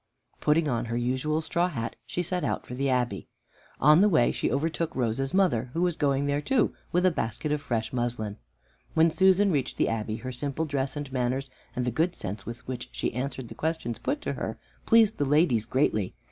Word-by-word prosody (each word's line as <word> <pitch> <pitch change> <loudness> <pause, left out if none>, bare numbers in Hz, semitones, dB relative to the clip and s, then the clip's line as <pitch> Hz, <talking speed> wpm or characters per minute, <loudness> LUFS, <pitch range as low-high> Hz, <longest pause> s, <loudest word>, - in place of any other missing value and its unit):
Putting 155 +1 +3
on 120 -4 0
her 115 0 -2
usual 130 +6 0
straw 170 +2 +1
hat, 120 -10 -4
she 175 +10 -2
set 180 +1 -2
out - - -1
for - - -8
the 135 +2 0
Abbey. 125 -2 0 0.5
On 150 +5 +6
the 210 - +6
way 155 -10 +4
she - - -1
overtook 160 +4 -1
Rose's 130 +2 0
mother, 170 - +2
who 170 - 0
was 175 -2 +1
going 140 -2 +1
there 145 +1 0
too 245 - +2 0.2
with 180 +2 +2
a 185 - +5
basket 145 +1 -2
of 150 -1 0
fresh 115 -6 -2
muslin. 120 -4 -2 0.6
When 160 +1 +5
Susan 190 +3 +4
reached 135 -5 -1
the - - +2
Abbey, 110 -1 -2
her 130 +3 -5
simple 140 +5 -2
dress 140 -2 -2
and 145 -2 -5
manners 130 +1 -1 0.2
and 125 - -1
the 125 - 0
good 165 +9 +1
sense 100 +3 -6
with 120 +2 -8
which 125 -2 -5
she - - -2
answered 130 0 -3
the - - -9
questions 160 -8 -2
put 295 +1 -2
to - - -2
her, - - -4 0.3
pleased 225 -2 +5
the - - +3
ladies 140 -6 +3
greatly. 110 -7 +1
140 Hz, 210 wpm, -27 LUFS, 120-160 Hz, 0.6 s, On